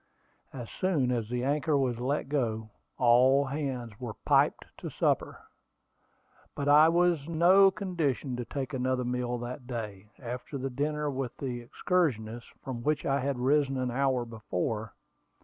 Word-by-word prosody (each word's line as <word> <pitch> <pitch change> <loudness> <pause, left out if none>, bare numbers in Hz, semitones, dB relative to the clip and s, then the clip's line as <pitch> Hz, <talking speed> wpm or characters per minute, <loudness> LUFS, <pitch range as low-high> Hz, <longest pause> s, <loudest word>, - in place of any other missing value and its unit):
As 120 -3 -7
soon 155 -10 0
as 115 -3 -1
the 125 0 -2
anchor 145 +2 +1
was 125 -4 0
let 135 +4 -1
go, 110 -6 -2 0.3
all 130 +3 +5
hands 135 -5 -4
were 120 -4 -6
piped - - +3
to - - -5
supper; - - 0 1.2
but 140 - -3
I 150 +2 +7
was 170 -3 +2
in 165 -1 -4
no 190 +4 +7
condition 165 - -2
to 120 - -4
take 140 +2 -4
another 130 0 0
meal 125 0 -1
that 120 +2 -7
day, 105 -5 -6
after 125 +3 -6
the 135 0 -3
dinner 150 +3 -1
with 130 -2 -4
the 125 -3 -4
excursionists, 120 - -1
from 125 -3 -5
which 150 +3 0
I 140 +1 +1
had 140 0 -1
risen 135 +1 +2
an 130 -1 -1
hour 130 -1 +1
before. 110 -1 -4
130 Hz, 155 wpm, -29 LUFS, 120-145 Hz, 1.2 s, I